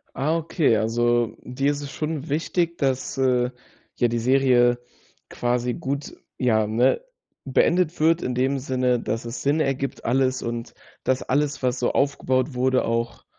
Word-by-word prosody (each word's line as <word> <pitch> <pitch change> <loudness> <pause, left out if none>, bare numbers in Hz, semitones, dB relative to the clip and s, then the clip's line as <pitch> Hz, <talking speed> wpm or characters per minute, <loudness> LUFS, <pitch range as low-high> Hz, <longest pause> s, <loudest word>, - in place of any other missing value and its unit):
Ah, 155 +5 +1
okay. 155 -7 +2
Also, 120 +1 +1
dir 135 +3 -1
ist 145 0 -4
es 140 -1 -7
schon 155 -1 -4
wichtig, 170 +3 0
dass, 135 -2 -1
äh, 125 -2 +2 0.5
ja 120 - +2
die 120 0 -1
Serie 125 -1 +4 0.5
quasi 125 0 -1
gut, 140 +4 -4 0.2
ja, 110 -4 +2
ne, 120 - +2 0.4
beendet 170 +5 +2
wird 165 +2 +3
in 125 - -2
dem 135 +2 +1
Sinne, 125 -2 0
dass 115 0 -3
es 115 +2 -5
Sinn 145 +3 +1
ergibt 135 -2 -2
alles 130 +1 +1
und 115 0 -5 0.3
dass 130 0 0
alles, 145 +1 0
was 125 0 0
so 120 - 0
aufgebaut 135 -1 +1
wurde, 130 +1 +1
auch 115 +1 -2
130 Hz, 155 wpm, -24 LUFS, 120-140 Hz, 0.5 s, Serie